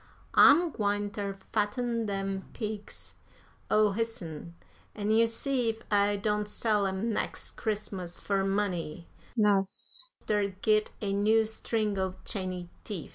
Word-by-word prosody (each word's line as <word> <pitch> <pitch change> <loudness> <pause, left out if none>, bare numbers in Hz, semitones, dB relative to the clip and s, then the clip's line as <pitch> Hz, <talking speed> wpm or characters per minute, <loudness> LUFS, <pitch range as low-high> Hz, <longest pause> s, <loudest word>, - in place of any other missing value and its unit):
I'm 330 +4 +7
gwine 205 -3 0
ter 200 -2 -4 0.2
fatten 230 +2 0
dem 195 -1 -2
pigs 215 -2 -5 0.6
o' 215 -1 +5
hisn, 185 -7 -4 0.4
an' 210 0 -1
you 225 +1 +5
see 245 +1 0
ef 225 0 -4
I 205 0 +4
don't 210 0 0
sell 210 -2 +2
'em 195 +4 -1
nex' - - -2
Christmas 200 -5 -3
fur 195 -1 0
money 185 -5 -1 0.3
'nouf 210 - +1 0.2
ter 205 -1 +2 0.2
git 215 -1 +3
a 200 -1 0
new 215 +2 +4
string 215 -2 -1
o' 190 -1 -1
chany 185 -4 -3
teef." 195 -8 -5
205 Hz, 130 wpm, -30 LUFS, 195-220 Hz, 0.6 s, I'm